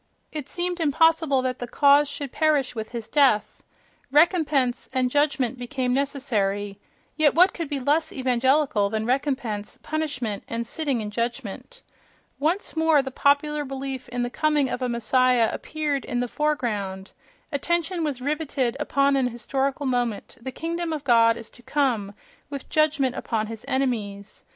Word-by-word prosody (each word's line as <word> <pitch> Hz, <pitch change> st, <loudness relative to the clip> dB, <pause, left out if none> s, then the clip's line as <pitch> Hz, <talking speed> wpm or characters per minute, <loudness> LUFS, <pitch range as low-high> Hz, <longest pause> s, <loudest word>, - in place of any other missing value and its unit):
It 300 Hz, -3 st, -6 dB
seemed 355 Hz, 0 st, -2 dB
impossible 320 Hz, -3 st, +3 dB
that 255 Hz, -1 st, -2 dB
the 245 Hz, -, -4 dB
cause 285 Hz, +3 st, +4 dB
should 285 Hz, -2 st, -5 dB
perish 300 Hz, -4 st, +1 dB
with 220 Hz, -2 st, -5 dB
his 230 Hz, -3 st, -6 dB
death: 270 Hz, -8 st, +2 dB, 0.5 s
"recompense" 295 Hz, -5 st, +2 dB
and 255 Hz, -1 st, +1 dB
"judgment" 270 Hz, -3 st, +1 dB
became 250 Hz, 0 st, -2 dB
necessary 210 Hz, -8 st, -1 dB, 0.4 s
(—yet 310 Hz, -2 st, +4 dB
what 360 Hz, +3 st, +6 dB
could 335 Hz, -4 st, -5 dB
be 285 Hz, -, -2 dB
less 305 Hz, +4 st, +1 dB
evangelical 260 Hz, -3 st, +2 dB
than 220 Hz, +1 st, -2 dB
"recompense," 250 Hz, -5 st, -2 dB
"punishment," 265 Hz, -10 st, -3 dB
and 230 Hz, 0 st, -3 dB
"sitting 275 Hz, -2 st, -1 dB
in 210 Hz, -1 st, -5 dB
judgment"!). 240 Hz, -, -4 dB, 0.6 s
Once 325 Hz, +7 st, 0 dB
more 320 Hz, -3 st, +4 dB
the 265 Hz, -, -5 dB
popular 290 Hz, +2 st, +2 dB
belief 265 Hz, -2 st, -5 dB
in 245 Hz, 0 st, -2 dB
the 245 Hz, -, -3 dB
coming 300 Hz, -3 st, +1 dB
of 250 Hz, -, -3 dB
a 250 Hz, -, 0 dB
messiah 240 Hz, 0 st, +3 dB
appeared 300 Hz, -3 st, -2 dB
in 245 Hz, -, -2 dB
the 245 Hz, -, 0 dB
foreground; 220 Hz, -10 st, -2 dB, 0.4 s
attention 340 Hz, +4 st, -1 dB
was 280 Hz, -5 st, -2 dB
rivetted 280 Hz, -3 st, -1 dB
upon 280 Hz, -1 st, +2 dB
an 265 Hz, -2 st, +2 dB
historical 270 Hz, +4 st, -2 dB
moment: 245 Hz, -5 st, -1 dB
the 260 Hz, +2 st, -5 dB
"kingdom 335 Hz, +4 st, -3 dB
of 300 Hz, -2 st, -4 dB
God" 230 Hz, -3 st, +4 dB
is 225 Hz, -, -9 dB
to 245 Hz, -, -16 dB
come, 235 Hz, -8 st, 0 dB, 0.3 s
with 280 Hz, -2 st, -7 dB
judgment 295 Hz, -5 st, +2 dB
upon 220 Hz, -2 st, -2 dB
his 225 Hz, +1 st, -8 dB
enemies.... 220 Hz, -7 st, -2 dB
265 Hz, 155 wpm, -24 LUFS, 240-295 Hz, 0.6 s, what